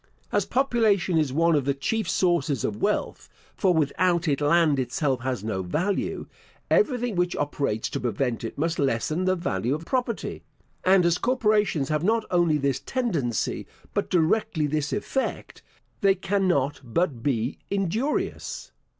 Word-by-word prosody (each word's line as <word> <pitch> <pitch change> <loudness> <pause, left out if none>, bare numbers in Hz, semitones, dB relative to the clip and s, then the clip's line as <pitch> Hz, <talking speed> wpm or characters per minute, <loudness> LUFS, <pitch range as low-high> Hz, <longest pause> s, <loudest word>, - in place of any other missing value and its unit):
As - - +1
population 220 -10 +2
is 150 -4 0
one 165 +4 +3
of 145 -4 +1
the 140 -1 +1
chief 220 +10 -1
sources 160 - +1
of 105 0 -3
wealth - - -1 0.3
(for 190 - +2
without 170 +2 +1
it 145 -1 +1
land 150 -1 +3
itself 130 +1 0
has 125 -4 -3
no 105 -4 -2
value), 170 - -1 0.5
everything 245 - +2
which 180 0 0
operates 140 -6 -1
to - - -2
prevent 120 0 -1
it 115 - -5
must 165 +3 -1
lessen 140 +6 0
the 185 0 +3
value 125 - -1
of 160 +2 -7
property; 245 -1 -2 0.4
and 185 -1 +5
as 170 0 +2
corporations 210 - +1
have 155 0 0
not 220 +3 +2
only 170 -4 +3
this 140 -2 0
tendency, 165 - -2 0.3
but - - -1
directly 165 -1 +1
this 145 0 -1
effect, 260 +6 -3 0.4
they 195 -3 +4
cannot 185 -8 0
but 130 +1 -1
be 120 -1 -1
injurious. 200 - -2
165 Hz, 150 wpm, -25 LUFS, 140-195 Hz, 0.5 s, and